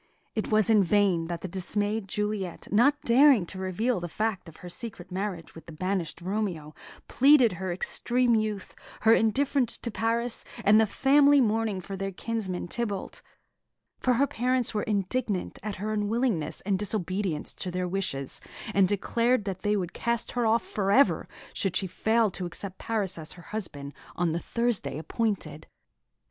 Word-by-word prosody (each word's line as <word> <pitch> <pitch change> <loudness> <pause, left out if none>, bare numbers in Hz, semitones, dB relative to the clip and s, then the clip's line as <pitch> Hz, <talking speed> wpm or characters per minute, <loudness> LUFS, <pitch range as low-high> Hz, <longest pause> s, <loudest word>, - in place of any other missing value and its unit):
It 215 - -2
was 215 -1 +4
in 210 -2 +5
vain 185 -3 +2
that 170 0 -4
the - - -4
dismayed 205 +3 -2
Juliet, 210 -2 -3
not 275 +8 +4
daring 250 -4 +5
to 185 - -9
reveal 190 +5 0
the 175 - -4
fact 210 -2 -2
of 160 - -16
her - - -6
secret 185 -1 -6
marriage 185 -2 -4
with 165 - -13
the - - -8
banished 180 -1 -3
Romeo, 180 -6 -3 0.3
pleaded 270 -3 +5
her 185 +1 -4
extreme 240 +7 +1
youth, 215 -3 -1 0.3
her 225 +1 +6
indifference 255 +2 +2
to 235 - -5
Paris, 230 +2 -1 0.2
and 215 +2 +7
the 220 - +3
family 285 +5 +5
mourning 220 -4 +1
for 195 +2 -7
their 195 0 -3
kinsman, 190 -3 -3
Tybalt; 205 -1 -3 0.8
for 255 - +2
her 275 +4 +4
parents 250 -1 0
were 210 - 0
indignant 205 0 -2
at 210 -1 -4
her 215 +3 -3
unwillingness 210 - -1
and 195 -1 0
disobedience 190 -5 -1
to 185 - -5
their 180 0 -2
wishes, 175 -8 -3 0.3
and 195 -1 +4
declared 230 +3 +1
that 190 -2 -4
they 210 0 +1
would 180 -3 -2
cast 235 0 -1
her 240 -2 0
off 225 +1 +3
for 195 -2 -1
ever 275 +6 +4 0.3
should 190 -3 -2
she 195 - 0
fail 220 +4 +1
to 180 -1 -4
accept 185 +2 -6
Paris 205 -6 -1
as 155 - -5
her 175 - -13
husband 145 -10 -5 0.2
on 175 -2 +1
the 165 - -1
Thursday 235 -4 -1
appointed. 160 -4 -3
205 Hz, 170 wpm, -27 LUFS, 185-230 Hz, 0.8 s, and